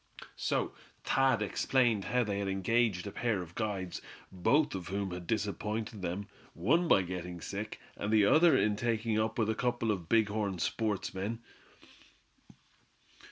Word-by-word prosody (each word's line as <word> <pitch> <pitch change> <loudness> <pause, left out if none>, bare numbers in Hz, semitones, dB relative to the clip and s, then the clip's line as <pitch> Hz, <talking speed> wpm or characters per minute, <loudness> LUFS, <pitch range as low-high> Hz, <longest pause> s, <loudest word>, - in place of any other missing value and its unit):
So - - -1 0.3
Thad 130 -5 +3
explained 115 -1 +1
how 125 0 +2
they 100 -2 -2
had 100 - -2
engaged 95 0 +1
a 100 - -5
pair 110 -6 -1
of 85 -1 -13
guides, 100 -4 -3 0.3
both 110 - +2
of 90 -3 -5
whom 100 0 -2
had 90 -1 -6
disappointed 105 +1 -2
them, 90 +3 -3 0.3
one 155 - +2
by 95 - +5
getting 90 -1 -5
sick, 100 +5 -5 0.2
and 100 - -3
the 110 -2 +5
other 160 +9 +6
in 105 +1 +2
taking 115 -1 0
up 110 0 -1
with 110 -3 +2
a - - +1
couple 120 -1 0
of 90 -6 -4
big 110 -2 +4
horn 100 -3 -1
sportsmen. 105 +3 -2
105 Hz, 155 wpm, -32 LUFS, 95-115 Hz, 0.3 s, other